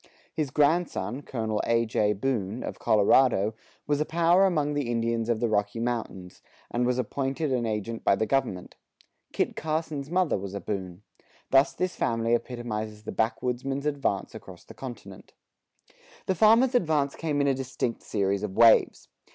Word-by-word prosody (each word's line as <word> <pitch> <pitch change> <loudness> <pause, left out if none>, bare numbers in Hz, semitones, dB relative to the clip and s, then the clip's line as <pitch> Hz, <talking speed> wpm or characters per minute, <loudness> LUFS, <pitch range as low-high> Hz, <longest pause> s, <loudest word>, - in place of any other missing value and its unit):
His 150 -3 -2
grandson, 145 -1 +1
Col. 110 -6 -2
A. 115 0 +2
J. 105 -1 +1
Boone, 110 -1 -2
of - - -6
Colorado, 110 0 +3 0.3
was 145 0 0
a - - +4
power 170 +4 +3
among 150 -5 0
the 145 -4 -2
Indians 115 -1 -1
of 115 -2 +1
the 120 - +1
Rocky 105 0 -1
Mountains, 115 -6 -4 0.3
and 120 +1 0
was 125 0 +1
appointed 135 +4 -2
an 120 -2 0
agent 110 +1 -3
by - - +4
the 110 - 0
government. 120 -9 -2 0.5
Kit - - -1
Carson's 155 -2 -3
mother 180 - +1
was 100 0 -6
a - - -3
Boone.[19:1] 95 -1 -5 0.5
Thus 135 +1 +4
this 185 0 -2
family 115 0 0
epitomizes 110 -3 -3
the - - -5
backwoodsman's 125 +4 -2
advance 145 -2 -1
across - - -11
the - - -13
continent. - - -10 0.9
The 190 - +1
farmer's 225 +7 +5
advance 155 - +1
came 150 -3 -2
in 140 - +2
a 135 - +3
distinct 130 -2 -3
series 100 -1 -1
of 100 -2 -4
waves. 115 0 +5
120 Hz, 160 wpm, -27 LUFS, 110-145 Hz, 0.9 s, farmer's